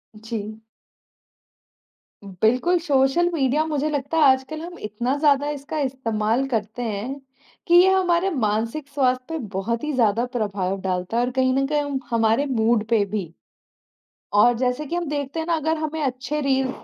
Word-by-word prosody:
जी। 220 -1 -6 1.6
बिल्कुल, 220 - +1
social 290 +2 +2
media 290 0 +1
मुझे 305 -1 -1
लगता 290 +1 -2
है 315 - +5
आजकल 265 +4 -3
हम 350 +1 -8
इतना 240 +6 -2
ज़्यादा 290 -1 +3
इसका 305 +3 -5
इस्तेमाल 245 -3 0
करते 225 0 -2
हैं, 230 +5 -4 0.5
कि 345 - +2
ये 380 - +5
हमारे 365 -1 +2 0.2
मानसिक 230 +8 -2
स्वास्थ्य 255 -3 0
पे 325 - -3 0.2
बहुत 230 +6 -2
ही 300 - -1
ज़्यादा 230 -2 +2
प्रभाव 195 -3 -2
डालता 185 +3 -2
है 240 - +3
और 250 - -3
कहीं 260 0 +2
न 270 +1 +1
कहीं 295 0 +1
हम 285 -2 -3
हमारे 230 +3 +2
मूड 230 -4 +1
पे 225 -3 +3
भी 190 -6 -3 1.1
और 245 - +5
जैसे 250 +4 -1
कि 335 - -4
हम 350 0 -1
देखते 290 +1 -3
हैं 320 - -3
ना 340 - +2
अगर 320 +1 -1
हमें 310 0 -3
अच्छे 275 +2 -2
रील्स 265 -2 -1
260 Hz, 170 wpm, -23 LUFS, 225-300 Hz, 1.6 s, है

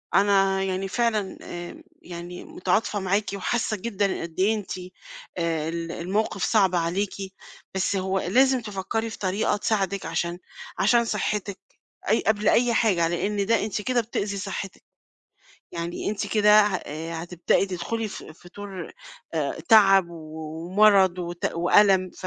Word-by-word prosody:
أنا 195 -1 +3
يعني 190 0 -2
فعلًا 215 -2 -1
آآ، 175 0 -8 0.2
يعني 175 0 -8
متعاطفة 205 +3 -1
معاكِ 195 +2 0
وحاسة 215 +3 -1
جدًا 200 -2 -1
قد 165 -1 -8
إيه 205 +4 +3
أنتِ 210 -3 -6 0.7
آآ، 165 -2 -1
ال 165 0 -4
الموقف 195 +3 -2
صَعب 195 -5 +3
عليكِ، 180 +4 0 0.6
بس 190 +1 0
هو 190 0 0
لازم 260 +7 +3
تفكّري 215 +2 -3
في 220 - -8
طريقة 200 +2 0
تساعدِك 200 -2 -1
عشان 170 +1 -2 0.4
عشان 235 +3 +4
صحِّتِك 205 -3 -2 0.5
أي 220 - +3
قبل 215 -1 +3
أي 240 0 +3
حاجة، 190 -8 +2
لأن 200 +4 -1
ده 225 0 +2
أنتِ 210 -1 -3
كده 250 +2 +1
بتؤذي 205 -3 -3
صحِّتِك، 195 0 -6 0.9
يعني 170 +3 -3
أنتِ 210 - -3
كده 210 0 +5
ه 205 -3 0 0.4
هتبدئي 175 +3 0
تدخلي 195 +5 -3
ف - - -8
في 160 +3 -14
دور 195 -4 -7 0.4
آآ، 150 -2 -2
تَعَب 195 -4 +7
ومَرَض 170 +5 +2
وت 175 -1 -3
وأَلَم، 185 +2 +4
ف 185 - -8
195 Hz, 140 wpm, -25 LUFS, 175-210 Hz, 0.9 s, تَعَب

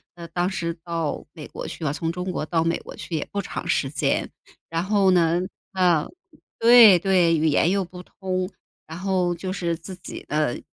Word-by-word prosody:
呃， 170 -1 -9
当 175 +1 0
时 170 -3 -3
到 165 -3 -3
美 155 -3 -9
国 - - -7
去 - - -8
了， 140 -2 0
从 165 +2 -2
中 180 +2 -4
国 170 - -3
到 165 0 +1
美 165 +1 0
国 - - -11
去 170 - -6
也 155 - -2
不 205 - -2
长 200 - -5
时 135 - +1
间。 145 +2 0 0.4
然 165 +1 -1
后 195 -1 +3
呢， 170 -1 +3 0.3
嗯， 175 -5 +2 0.5
对 230 -5 +8
对， 175 -2 +3
语 160 +1 +2
言 155 +2 +3
又 195 0 +1
不 180 +1 -10
通， 185 0 -4 0.4
然 160 - -8
后 185 -2 0
就 185 +2 -4
是， 170 -3 -1
自 185 +3 -9
己 180 - -9
的 150 -4 0
175 Hz, 215 characters per minute, -24 LUFS, 165-185 Hz, 0.5 s, 对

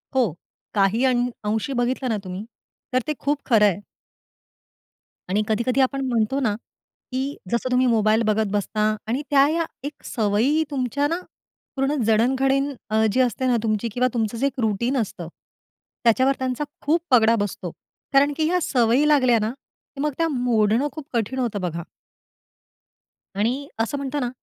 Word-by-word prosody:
हो, 240 - +2 0.4
काही 205 +4 +2
अं 245 -1 +2 0.2
अंशी 220 +6 -1
बघितलं 250 +1 -1
ना 220 - 0
तुम्ही 185 +3 -6 0.5
तर 255 - +4
ते 305 - 0
खूप 290 0 0
खरंय. 210 -6 +4 1.5
आणि 200 +3 +2
कधी-कधी 235 +4 +1
आपण 270 +1 +1
म्हणतो 235 +3 +1
ना, 220 -7 +1 0.6
की 265 +3 -2 0.2
जसं 245 +2 0
तुम्ही 255 0 +3
मोबाईल 220 -1 +3
बघत 215 +1 +2
बसता 215 +1 0
आणि 245 +5 -1
त्या 280 -1 +5
या 330 +1 0 0.2
एक 285 +1 -7
सवयी 230 +8 +1
तुमच्या 280 +1 0
ना, 335 +3 -1 0.6
पूर्ण 270 +2 0
जडणघडण 265 +5 +2 0.2
अ, 220 +1 +3
जी 255 - 0
असते 255 +1 0
ना, 245 -2 +3
तुमची 215 +1 0
किंवा 250 +2 +2
तुमचं 225 -1 -1
जे 270 - 0
एक 275 -1 -5
रुटीन 235 +4 0
असतं, 190 -7 -3 0.8
त्याच्यावर 260 +4 +4
त्यांचा 260 +2 -2 0.2
खूप 320 +4 +2
पगडा 230 -2 +6
बसतो. 200 -4 -3 0.4
कारण 285 +1 +4
की 315 - +1
ह्या 360 +2 +2
सवयी 250 0 +3
लागल्या 255 -6 +4
ना, 215 +2 -1 0.5
मग 300 +1 +1
त्या 330 - +2
मोडणं 240 0 +2
खूप 310 -3 -8
कठीण 235 +3 -1
होतं 230 -5 -1
बघा. 170 -1 -3 1.5
आणि 245 +8 -1
असं 230 +5 0
म्हणतो 280 +1 -3
ना, 250 -3 -1
245 Hz, 155 wpm, -23 LUFS, 220-275 Hz, 1.5 s, पगडा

